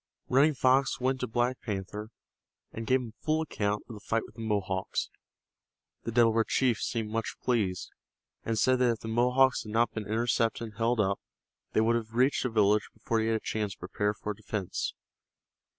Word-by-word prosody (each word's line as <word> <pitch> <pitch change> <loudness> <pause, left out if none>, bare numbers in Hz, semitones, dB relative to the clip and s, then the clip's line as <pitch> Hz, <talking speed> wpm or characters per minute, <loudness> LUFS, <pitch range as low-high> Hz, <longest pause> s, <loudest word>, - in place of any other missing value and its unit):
Running 140 +4 +4
Fox 130 +1 +3
went 130 +1 0
to 125 - -2
Black 120 +2 0
Panther 105 0 -5 0.6
and 115 0 -6
gave 130 0 +3
him 120 - -6
a 110 - -22
full 155 +1 +1
account 105 -8 -2
of 120 - -8
the 105 - -9
fight 115 +3 -1
with - - -15
the 115 - -9
Mohawks. 100 -3 -1 0.9
The 115 - -2
Delaware 115 -1 +4
chief 125 -1 +1
seemed 110 -3 -2
much 115 0 -2
pleased, 100 -8 0 0.5
and 115 -1 -1
said 130 +3 +3
that 125 -1 +4
if 115 - -9
the - - -6
Mohawks 125 +3 +3
had 105 - -8
not 115 +1 +3
been 110 -2 -5
intercepted 115 +1 +1
and 105 - -18
held 115 +1 +1
up 100 -1 +1 0.5
they - - +4
would 115 +1 +3
have 110 -1 -4
reached 130 +3 +3
the 125 - 0
village 105 -2 +3
before 115 - -1
he 110 - 0
had 115 - +2
a - - 0
chance 105 -2 -2
to - - -20
prepare 105 +3 -1
for 105 - -4
defense. 105 -2 -4
115 Hz, 200 wpm, -29 LUFS, 105-125 Hz, 0.9 s, Running